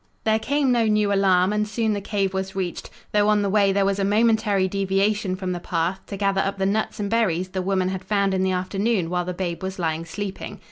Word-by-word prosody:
There 220 0 +2
came 280 +3 +1
no 235 -2 +2
new 210 -1 +2
alarm, 190 -1 +3
and 210 0 0
soon 220 0 0
the 205 - -3
cave 195 -1 -1
was 190 0 -3
reached, 185 -3 -4 0.2
though 210 0 +3
on 210 -1 +3
the 200 - 0
way 200 -1 +4
there 195 0 +2
was 200 0 0
a - - +1
momentary 210 -2 +2
deviation 195 +1 0
from 185 -1 -4
the 175 - -3
path, 175 +2 -1
to 200 - -6
gather 195 -1 +1
up 195 0 -2
the 190 - 0
nuts 215 +2 -1
and 205 - -1
berries 190 -5 0
the 185 0 -3
woman 185 0 0
had 190 0 -4
found 200 0 +1
in 190 - 0
the 190 0 +1
afternoon 185 0 -1
while 180 -1 0
the 180 0 -4
babe 175 -1 -3
was 190 0 -4
lying 165 -2 -2
sleeping. 195 +3 -6
195 Hz, 240 wpm, -23 LUFS, 185-210 Hz, 0.2 s, way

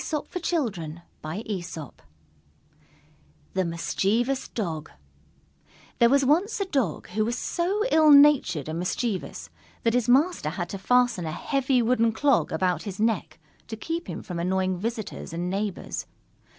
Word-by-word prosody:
_ 250 - -3 2.5
THE 190 - +1
MISCHIEVOUS 215 +10 0
DOG 165 -8 -4 1.1
There 235 - +6
was 275 +1 +4
once 355 - +2
a 395 - 0
Dog 265 - -1
who 215 +4 0
was 235 +3 -1
so 385 - -1
ill 315 -1 +6
natured 280 - +6
and 160 +1 -3
mischievous 195 +3 -3 0.3
that 230 - +2
his 245 -1 +1
Master 280 - +3
had 175 +1 -4
to 195 - -5
fasten 245 -5 +2
a - - -3
heavy 265 - +1
wooden 230 -1 +2
clog 275 +2 +2
about 180 +2 0
his 200 -2 -7
neck 220 -6 0 0.3
to 220 - -6
keep 330 +8 -4
him - - -6
from 175 -2 -5
annoying 185 +1 0
visitors 220 -4 -5
and 175 +2 -2
neighbors. 200 -1 -3
225 Hz, 135 wpm, -26 LUFS, 180-275 Hz, 2.5 s, There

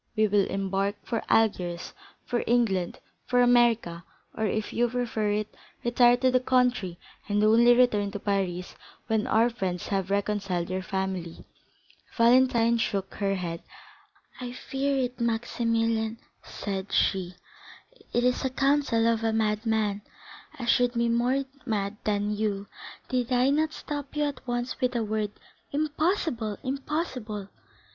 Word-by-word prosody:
We 215 -1 +4
will 205 -2 +2
embark 195 +1 -1
for 230 - -2
Algiers, 180 -6 +1 0.3
for 240 - -1
England, 210 -7 +1 0.3
for 250 0 +2
America, 235 -8 +3 0.3
or, 220 - 0
if 215 +1 -2
you 240 0 +2
prefer 230 -3 -1
it, 210 0 -2 0.3
retire 240 0 +5
to 255 +1 +2
the 255 - +4
country 250 -8 +1 0.3
and 205 +1 +2
only 235 +3 +6
return 215 -5 +3
to 205 0 -6
Paris 190 -3 -2 0.3
when 220 -2 0
our 225 +2 +4
friends 185 -7 -3
have 195 -2 -1
reconciled 195 -3 -1
your 185 0 -1
family." 190 -3 -4 0.7
Valentine 235 -1 +4
shook 195 -3 -2
her 195 -1 -1
head. 170 -2 -4 0.8
"I 245 -1 -5
feared 270 +1 -1
it, 250 0 -3
Maximilian," 230 -1 0 0.2
said 195 -1 -5
she; 185 -2 +1 0.8
"it 240 - +1
is 250 0 +2
the 265 - 0
counsel 270 -3 +2
of 230 -1 +1
a 225 - +2
madman, 215 -1 0 0.6
and - - -8
I - - -3
should 245 +1 +3
be 235 0 +1
more 250 +4 +1 0.2
mad 210 -3 -2
than 210 0 0
you, 205 -2 -1 0.4
did 250 -1 -1
I 250 +2 +3
not 310 +2 +1
stop 290 -3 -6
you 300 - +1
at 285 -3 -4
once 240 +1 -3
with 255 0 +1
the 235 -2 0
word 215 -1 -1 0.4
'Impossible, 295 - -1
Morrel, - - -30
impossible! 255 - -3
225 Hz, 145 wpm, -27 LUFS, 200-245 Hz, 0.8 s, only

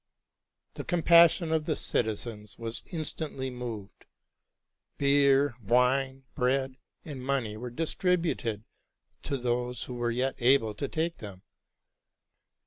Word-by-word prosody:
The - - -6
compassion 170 -1 +5
of 160 -1 +1
the 155 - 0
citizens 105 -2 -2
was 115 0 -4
instantly 155 -5 -3
moved. 115 -5 -7 0.9
Beer, 140 -1 +4
wine, 130 +4 +2
bread, 130 +1 0 0.3
and 140 -5 -7
money 130 -6 -1
were 125 +3 -6
distributed 165 - -1 0.6
to 140 - -2
those 125 0 -2
who 125 - -7
were 120 -1 -1
yet 125 +3 0
able 120 -3 +4
to 140 +7 -4
take 165 +2 -2
them. 100 -4 -10
130 Hz, 115 wpm, -29 LUFS, 120-145 Hz, 0.9 s, compassion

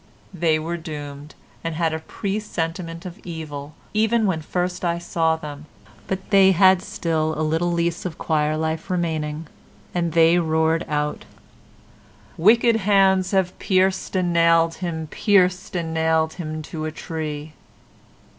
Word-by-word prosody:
They 165 -3 +2
were 165 +2 -3
doomed 150 -3 -8 0.3
and 165 -1 -3
had 165 -1 0
a 160 - -2
presentiment 170 -3 -4
of 180 +3 -8
evil, 155 -3 -7 0.2
even 220 +1 +2
when 180 -5 0
first 180 +3 -2
I 170 -1 +1
saw 165 -1 0
them, 150 -1 -9 0.4
but 190 +1 -4
they 190 -1 +6
had 185 0 +5
still 160 -4 -1
a 155 - 0
little 165 +3 0
lease 170 0 -1
of 175 -4 -5
choir 155 -1 0
life 160 +2 -2
remaining, 160 -3 -2 0.5
and 170 -2 -1
they 165 +1 +5
roared 160 0 +1
out 150 0 -2 1.1
wick 215 +8 +5
ed 230 -1 +4
hands 190 -2 +3
have 190 -2 0
pierced 190 0 +1
and 180 -2 +1
nailed 165 0 +4
him, 165 -3 -3
pierced 185 +2 +2
and 165 -2 -2
nailed 160 0 +1
him 155 -3 -5
to 155 0 -5
a 155 - -3
tree. 155 -2 -5
165 Hz, 145 wpm, -22 LUFS, 160-185 Hz, 1.1 s, they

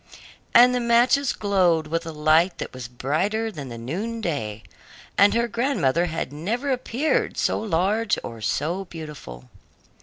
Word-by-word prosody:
And 245 +1 +8
the 250 - +1
matches 245 +3 +3
glowed 180 -6 +2
with 165 +2 -3
a - - -4
light 155 +4 +3
that - - -6
was 130 -2 -7
brighter 185 - -1
than 145 -8 -8
the 120 - -7
noon 190 - -4
day, 110 - -3 0.5
and 205 +2 +5
her 235 0 +2
grandmother 205 - +1
had 160 -4 -4
never 230 - -2
appeared 255 +3 -1
so - - +1
large 210 +3 +1
or 115 -1 -8
so 170 - -1
beautiful. 150 - -9
175 Hz, 150 wpm, -24 LUFS, 150-230 Hz, 0.5 s, And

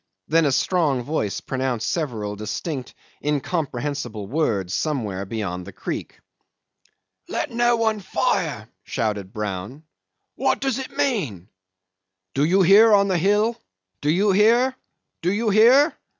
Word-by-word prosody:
Then 165 +1 +3
a 140 - +2
strong 145 -4 +1
voice 120 -8 -2
pronounced 130 -4 -2
several 120 - -2
distinct 125 - -5 0.3
incomprehensible 140 - -2
words 100 - -1
somewhere 105 -11 -2
beyond 95 -5 -4
the - - -7
creek. - - -6 1.1
"Let - - -3
no 240 +1 +3
one 220 -2 0
fire," 190 - -1 0.2
shouted 105 -4 -3
Brown. 105 +7 -5 0.5
"What 270 - 0
does 270 -2 -1
it 265 - -8
mean?"... 125 - -1 0.8
"Do 140 - +1
you 185 +5 +4
hear 205 +5 +7
on 200 -1 +4
the 180 -2 +1
hill? 210 +6 +1 0.4
Do 145 - 0
you 195 +6 +3
hear? 235 +6 +4 0.5
Do 175 - +1
you 215 +2 0
hear?" 250 - +6
155 Hz, 130 wpm, -23 LUFS, -, 1.1 s, hear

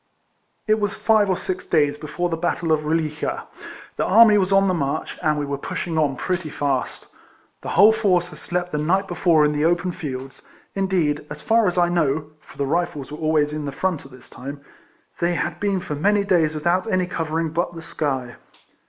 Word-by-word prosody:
It 215 0 +2
was 205 0 -1
five 215 -3 +3
or 185 - +1
six 185 -1 -4
days 145 -1 +2
before 155 +4 -3
the 165 - -1
battle 170 0 -1
of 155 - +4
Eoli9a, 155 0 -2 0.5
the - - +1
army 220 +1 +6
was 190 0 0
on 195 0 +4
the 185 - +2
march, 140 -5 -2
and 155 -3 +1
we 145 - -1
were 140 -1 -4
pushing 165 +3 -4
on 145 -3 +1
pretty 180 +3 -2
fast. 140 -3 -2 0.6
The - - -6
whole 210 +2 +8
force 185 -5 +1
had - - -11
slept 180 0 -3
the 150 - -1
night 190 +6 +1
before 170 -3 +3
in 150 - +2
the 150 0 0
open 175 +2 +1
fields; 135 -5 -7 0.3
indeed, 185 -7 0
as 150 0 -8
far 225 -2 +3
as 180 - -1
I 175 -1 +4
know, 155 -3 0
(for - - -18
the 140 - 0
Rifles 150 -2 -2
were 150 - -7
always 155 -2 +1
in 150 -1 -4
the 140 - -3
front 175 +2 -2
at 135 - -13
this 130 0 -14
time,) 140 +3 -8 0.6
they 175 0 +1
had - - -2
been 200 -2 0
for 165 - -5
many 200 +8 +2
days 165 -5 +2
without 175 +7 0
any 185 -1 +2
covering 165 -2 -2
but 175 +2 -2
the 165 - -8
sky. 130 -7 -3
165 Hz, 205 wpm, -22 LUFS, 150-185 Hz, 0.6 s, whole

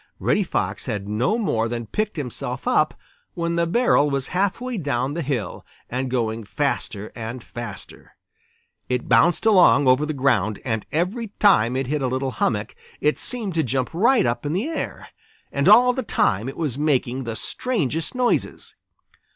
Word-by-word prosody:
Reddy - - +2
Fox - - -2
had 100 -1 -3
no 120 - 0
more 115 - 0
than 120 0 -4
picked 210 - -3
himself 130 -6 -5
up - - +2 0.4
when 170 0 -1
the 170 0 +1
barrel 175 -7 +3
was 135 -1 -2
half 190 +3 0
way 250 0 -4
down 140 -5 -1
the 170 - -2
hill 135 -7 -3 0.3
and 130 +1 -2
going 115 -3 -1
faster 110 -4 -3
and 115 +1 -6
faster. 120 -4 -9 0.7
It 125 -1 -1
bounced 125 - +4
along 180 -9 +6
over 130 +4 +4
the 155 - -2
ground, 115 -7 +1
and 110 -4 -2
every 190 +9 -1
time 125 - +4
it 135 +1 -1
hit 145 +3 -2
a 130 - +1
little 130 +1 -2
hummock 110 -2 -1 0.3
it 150 +1 +1
seemed 225 -7 -1
to 165 - +1
jump 130 -2 -1
right 235 - +3
up 120 0 -1
in 145 +1 -2
the 210 - -1
air. 330 - -5 0.4
And - - +2
all 250 +1 +7
the 260 - -2
time 110 - 0
it 135 - -9
was 145 -5 -2
making 135 -3 0
the 115 -1 -4
strangest 165 - -2
noises. 250 -1 -1
140 Hz, 175 wpm, -23 LUFS, 120-180 Hz, 0.7 s, all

